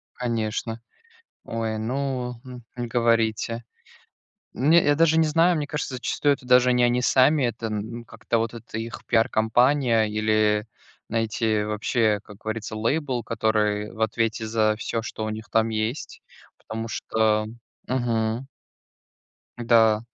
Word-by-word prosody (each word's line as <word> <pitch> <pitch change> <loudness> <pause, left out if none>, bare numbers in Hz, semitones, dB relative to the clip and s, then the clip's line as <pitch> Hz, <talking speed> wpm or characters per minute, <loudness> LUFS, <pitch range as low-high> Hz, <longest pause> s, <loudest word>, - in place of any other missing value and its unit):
Конечно. 115 -1 -3 0.6
Ой, 115 -1 -3
ну, 125 +2 -2
м, 125 -1 -10
не 120 -1 -4
говорите. 115 -1 +1 0.9
Не 160 +7 +4
я 145 - +3
даже 160 +1 +3
не 160 - +4
знаю, 165 +3 +3
мне 150 - -2
кажется, 145 -3 -4
зачастую 140 +3 +1
это 130 - -14
даже 125 0 +5
не 125 0 +2
они 120 +1 +2
сами, 135 +3 +4
это 120 -1 -2
н 105 -2 -2 0.2
ну 120 - -10
как-то 115 +1 -2
вот 115 +1 -2
это 115 -1 -7
их 115 +1 -7
пиар-кампания 115 +2 +3
или, 105 0 +1 0.4
знаете, 110 -1 0
вообще, 105 0 +1
как 105 -2 -13
говорится, 110 0 -5
лейбл, 125 +2 -1
который 105 -1 0
в 110 - -12
ответе 110 0 0
за 110 -1 +1
всё, 115 +1 -3
что 110 0 -5
у - - -2
них 110 0 -7
там 110 0 +2
есть, 110 +5 -3 0.4
потому 115 +1 -6
что 110 -1 0 0.4
Мгм. 120 -1 -1 1.1
Да. 115 -2 +4
115 Hz, 140 wpm, -24 LUFS, 110-125 Hz, 1.1 s, даже